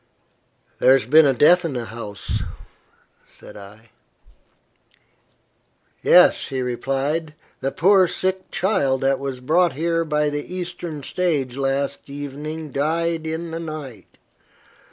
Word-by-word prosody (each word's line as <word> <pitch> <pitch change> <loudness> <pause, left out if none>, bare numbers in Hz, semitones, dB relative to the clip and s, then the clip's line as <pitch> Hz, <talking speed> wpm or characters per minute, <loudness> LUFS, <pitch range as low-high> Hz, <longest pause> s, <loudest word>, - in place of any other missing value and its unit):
"There 130 - +6
has 135 -4 +2
been 155 +4 +6
a 135 - +3
death 175 +8 +5
in 165 -4 -3
the 120 -2 -3
house," 105 -3 -5 0.9
said - - -14
I. 105 +3 -14 2.1
"Yes," - - +5
he 130 -1 -3
replied. 135 +6 -2 0.2
"The 135 +1 -2
poor 190 +3 +4
sick 185 +2 -3
child 140 -9 0
that 135 0 +1
was 135 -2 -5
brought 170 +5 +2
here 165 +3 0
by 150 -2 0
the 145 +5 -5
Eastern 175 -4 -6
stage 145 -7 -1
last 140 +1 -2
evening 145 +2 -6
died 160 +3 -1
in 165 +1 -4
the 165 - -4
night. 150 - -8
150 Hz, 125 wpm, -22 LUFS, 135-165 Hz, 2.1 s, There